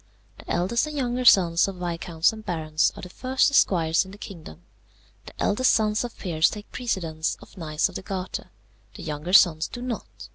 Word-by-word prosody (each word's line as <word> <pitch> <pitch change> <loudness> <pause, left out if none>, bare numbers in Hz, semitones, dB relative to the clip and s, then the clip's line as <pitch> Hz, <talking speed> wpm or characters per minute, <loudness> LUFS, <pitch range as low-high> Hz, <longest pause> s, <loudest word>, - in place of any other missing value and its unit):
The - - -13
eldest 195 - +1
and 300 -1 -6
younger 250 -1 -1
sons 175 -6 +5
of 195 - -5
viscounts 170 0 0
and 220 0 -10
barons 160 -4 0
are - - -10
the 180 - -7
first 260 +7 +1
esquires 165 -10 +3
in 190 - -13
the 200 - -11
kingdom. 170 - -10 0.6
The - - -13
eldest 250 +5 +3
sons 215 0 +1
of 240 -2 -7
peers 160 -4 +2
take 210 -1 -9
precedence 165 -10 -2
of - - -16
knights 155 -4 -1
of - - -12
the - - -5
garter. 190 -1 -5 0.5
The - - -9
younger 155 +3 -5
sons 165 -5 +6
do - - -8
not. 245 -2 -6
185 Hz, 190 wpm, -25 LUFS, 165-220 Hz, 0.6 s, sons